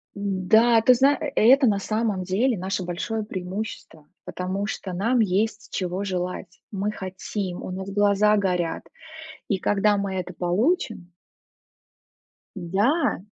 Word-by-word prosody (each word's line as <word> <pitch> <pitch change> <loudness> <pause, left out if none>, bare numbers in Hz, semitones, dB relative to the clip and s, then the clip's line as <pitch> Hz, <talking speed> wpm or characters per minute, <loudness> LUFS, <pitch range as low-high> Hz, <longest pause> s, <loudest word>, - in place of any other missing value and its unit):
М, 195 -2 -3
да, 225 +1 +6
ты 255 - +6
зна 275 +4 +4
э, - - -3
это 260 +4 +6
на 205 -2 +2
самом 215 -2 -1
деле 205 +6 0
наше 190 +1 -2
большое 215 +6 -3
преимущество. 185 -5 -6 0.2
Потому 190 +3 -3
что 190 -3 -5
нам 230 +8 +1
есть 210 +2 0
чего 185 +1 -2
желать, 180 0 -4
мы 205 +1 -2
хотим, 190 -1 -5
у - - -6
нас 190 +1 -5
глаза 205 +1 +3
горят, 180 -4 -1 0.6
и 200 - 0
когда 205 +2 +2
мы 200 -1 -2
это 180 -1 -4
получим 195 - -1 1.4
Да. 200 - 0
200 Hz, 135 wpm, -24 LUFS, 185-220 Hz, 1.4 s, да